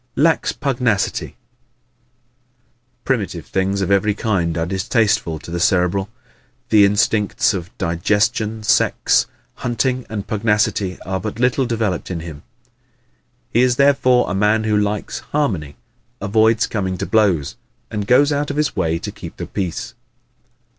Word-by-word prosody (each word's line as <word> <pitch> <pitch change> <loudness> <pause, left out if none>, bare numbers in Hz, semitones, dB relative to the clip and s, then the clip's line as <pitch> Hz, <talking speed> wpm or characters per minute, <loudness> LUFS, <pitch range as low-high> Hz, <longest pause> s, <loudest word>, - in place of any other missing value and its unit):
Lacks 160 +2 +2
Pugnacity 125 -8 -1
¶ - - -17 1.7
Primitive 100 - -2
things 95 +1 -1
of 95 - -1
every 100 +1 +2
kind 90 -7 -1
are 80 - 0
distasteful 95 -1 0
to 80 - -11
the 85 - -2
Cerebral. 95 +2 +1 0.6
The 105 -2 +6
instincts 105 +1 +2
of 90 -3 -5
digestion, 105 +6 0
sex, - - +2 0.3
hunting 125 +1 -1
and 105 -2 -4
pugnacity 105 -3 0
are 95 +1 -3
but 105 +3 -5
little 125 +1 +2
developed 110 -6 -2
in 85 -3 -4
him. 80 -3 -9 1.1
He 120 - +3
is 125 -1 +3
therefore 130 -2 +3
a 90 - -2
man 105 +3 +2
who 110 -1 +1
likes 105 0 -1
harmony, 95 - -1 0.4
avoids 110 +2 +2
coming 95 -4 -2
to - - -3
blows, 95 -10 +1 0.4
and 105 -2 -3
goes 140 +4 +4
out 145 0 -1
of 145 - -4
his 150 -2 0
way 85 -4 0
to - - -6
keep - - -10
the - - -5
peace. 90 -4 -4
105 Hz, 140 wpm, -19 LUFS, 95-115 Hz, 1.7 s, The